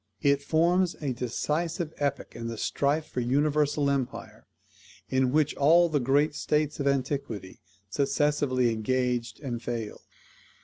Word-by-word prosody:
It 140 0 +3
forms 170 +4 +2
a 140 -4 -2
decisive 155 - -2
epoch 140 -1 -2
in 115 - -5
the 115 -1 -5
strife 145 +7 0
for 125 - -5
universal 145 +3 +1
empire, 140 -3 -3 0.6
in 130 -1 +2
which 150 +1 +2
all 170 +4 +5
the 150 -2 +1
great 140 +4 +2
states 150 0 -1
of 140 - 0
antiquity 130 -8 -2 0.3
successively 140 0 +1
engaged 120 0 -1
and 120 -5 -4
failed. 115 -3 -5
140 Hz, 130 wpm, -27 LUFS, 125-150 Hz, 0.6 s, all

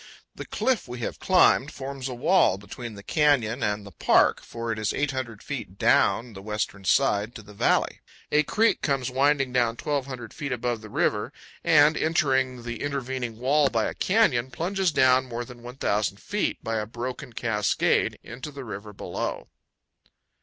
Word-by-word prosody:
The - - -8
cliff 260 - 0
we 125 0 -6
have - - -4
climbed 180 -6 +4
forms 135 -2 -6
a 125 - -5
wall 135 - +3
between 110 +3 -8
the 100 - -11
canyon 135 -4 +2
and 105 -1 -1
the 100 - -10
park, 80 - +3
for 115 0 -5
it 110 - -3
is 110 - -1
800 130 -6 -3
feet - - -6
down 120 0 +3
the 95 - -9
western 105 -2 -4
side 110 -1 +2
to 110 - -9
the 105 +1 -14
valley. 100 - +1 0.3
A 150 - +5
creek 220 +9 +2
comes 135 -3 0
winding 135 0 +2
down 120 -2 +2
1,200 130 -6 -3
feet 140 -2 -5
above 120 -2 -2
the 110 - -10
river, - - 0 0.3
and, 150 0 +5
entering 130 -6 +1
the 120 -2 -5
intervening 130 -4 -3
wall 140 +4 +3
by 115 -3 0
a - - -2
canyon, 165 - +2
plunges 185 +5 0
down 130 -2 +4
more 120 0 -4
than 125 -1 -12
1,000 110 -5 -1
feet, 210 0 -2
by 115 -1 -1
a 105 - -4
broken 125 +3 -6
cascade, 105 -3 +1
into 130 +4 -8
the 140 -2 -8
river 105 -1 -7
below. - - -4
125 Hz, 170 wpm, -26 LUFS, 115-140 Hz, 0.3 s, A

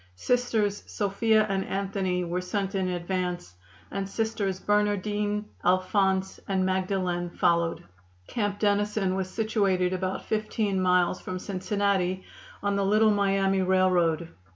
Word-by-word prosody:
Sisters 220 - 0
Sophia 215 +2 +2
and 195 -1 0
Anthony 190 -2 -1
were 175 +1 -2
sent 195 +2 -2
in 190 -2 0
advance, 180 - -3 0.4
and 195 -1 -3
Sisters 205 -3 -1
Bernardine, 210 0 0 0.2
Alphonse 190 +1 +1
and 190 -1 +1
Magdalen 185 -2 -1
followed. 170 -1 +1 0.4
Camp 205 - -2
Dennison 205 -2 +1
was 190 -1 -2
situated 195 -4 +1
about 185 0 -3
fifteen 215 -2 -1
miles 180 0 +2
from 185 - -5
Cincinnati, 190 -1 -1 0.4
on 200 0 +1
the 200 - +1
Little 215 +2 +4
Miami 195 -1 +2
Railroad. 180 -3 +2
195 Hz, 120 wpm, -27 LUFS, 185-205 Hz, 0.4 s, Little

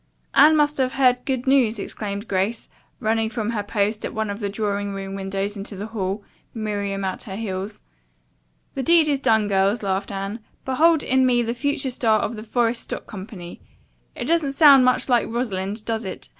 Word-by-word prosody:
"Anne 305 +3 +7
must 295 0 +2
have 260 -1 0
heard 250 -2 +3
good 260 -2 -2
news!" 260 -5 +3
exclaimed 205 +1 -5
Grace, 200 +4 -1 0.3
running 220 0 0
from 225 -1 -2
her 220 -3 -1
post 205 +1 -1
at - - -5
one 220 -1 -1
of 200 - -6
the 205 -2 -2
drawing 205 -1 -2
room 195 0 -5
windows 195 +1 -3
into 200 +1 -6
the 200 +2 -5
hall, 205 -2 -3 0.3
Miriam 200 -3 -2
at 185 - -3
her 190 -4 -6
heels. 200 -1 -5 0.9
"The 270 - -3
deed 325 +3 +5
is 285 -2 +1
done, 220 -5 +2
girls," 200 +2 +1
laughed 195 +1 -1
Anne. 195 +3 -4 0.3
"Behold 315 +4 +3
in 260 0 +2
me 245 -2 +3
the 230 0 -2
future 275 +1 -1
star 225 -3 +2
of 235 - -2
the 215 - -7
Forest 230 +1 0
Stock - - -6
Company. 190 -3 -9 0.5
It - - -4
doesn't 320 -4 +1
sound 275 -3 +7
much 255 0 +2
like 245 -3 +2
Rosalind, 210 -3 -3
does 225 0 -2
it? 190 - -7
220 Hz, 190 wpm, -23 LUFS, 200-255 Hz, 0.9 s, Anne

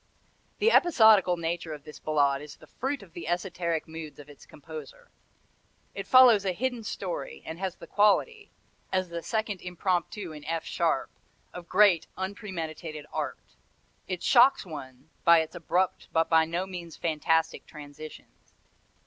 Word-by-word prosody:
The 450 +2 +3
episodical 220 - +5
nature 165 -1 -3
of 145 - -14
this 150 0 -11
Ballade 140 -3 +1
is 150 0 -10
the - - -17
fruit 270 -1 -4
of 175 - -17
the 170 - -7
esoteric 175 -2 -2
moods 160 -1 -8
of 145 0 -13
its 145 - -17
composer. 150 -1 -11 0.8
It 195 - -6
follows 250 -5 +7
a 190 -2 0
hidden 245 +3 -2
story, - - -5
and 160 +1 -7
has 190 -2 -3
the - - -12
quality 410 - +2 0.4
as 185 -1 0
the 170 0 -5
second 215 -1 -2
Impromptu 180 +1 -2
in 150 -1 -10
F 165 0 -3
sharp - - 0 0.4
of 175 -1 -9
great, 195 -6 +4
unpremeditated 170 -6 -5
art. - - -5 0.5
It 185 -2 -4
shocks 255 -2 +5
one 140 -3 -10
by 170 -1 +7
its 160 - -6
abrupt 180 +1 -1
but 165 0 +2
by 160 0 +5
no 170 +3 -2
means 175 -3 -8
fantastic 160 0 0
transitions. 150 0 -12
175 Hz, 150 wpm, -28 LUFS, 160-200 Hz, 0.8 s, follows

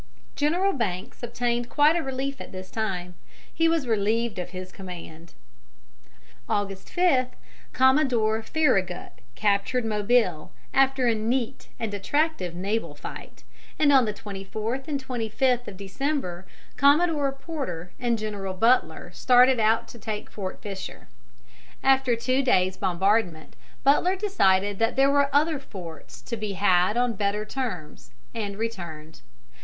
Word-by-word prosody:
General 350 +7 +2
Banks 190 -8 -3
obtained 240 0 -1
quite 300 +2 +4
a 340 - +1
relief 270 -1 -4
at - - -9
this 185 0 -9
time: 180 -5 -3 0.4
he 330 - +2
was 325 -4 +1
relieved 220 0 0
of 180 - -4
his 185 0 -8
command. 170 -3 -10 1.1
August 195 -2 -2
5, 340 -9 +3 0.4
Commodore 255 -5 +3
Farragut 195 - 0 0.2
captured 210 +4 +1
Mobile, 210 -6 +1 0.2
after 270 -1 +3
a 235 - +4
neat 230 +2 -2
and 225 -3 -3
attractive 205 - 0
naval 200 +5 -2
fight, - - -9 0.3
and 290 -2 +4
on 265 -3 +6
the 215 - -1
24th 215 +6 -5
and 280 -3 -3
25th 245 +1 0
of 190 - -8
December 195 - -3 0.3
Commodore 290 0 +4
Porter 270 - -6
and 240 -2 +1
General 205 -3 -4
Butler 235 +6 +2
started 250 0 +5
out 220 +1 +2
to 235 - -11
take 210 -1 -5
Fort 190 -3 -6
Fisher. 195 - -7 0.7
After 265 -2 +4
two 255 +3 +1
days' 190 -8 +2
bombardment, 185 -2 0 0.3
Butler 320 +7 +4
decided 205 - +2
that 225 +1 +1
there 275 +1 +4
were 280 -1 +3
other 300 +1 +2
forts 175 - -10
to 235 - -4
be 215 -2 -4
had 185 +1 +3
on 245 -1 +2
better 205 +1 -1
terms, 215 - -5 0.2
and 205 -3 -4
returned. 170 -9 -6
225 Hz, 135 wpm, -26 LUFS, 195-270 Hz, 1.1 s, on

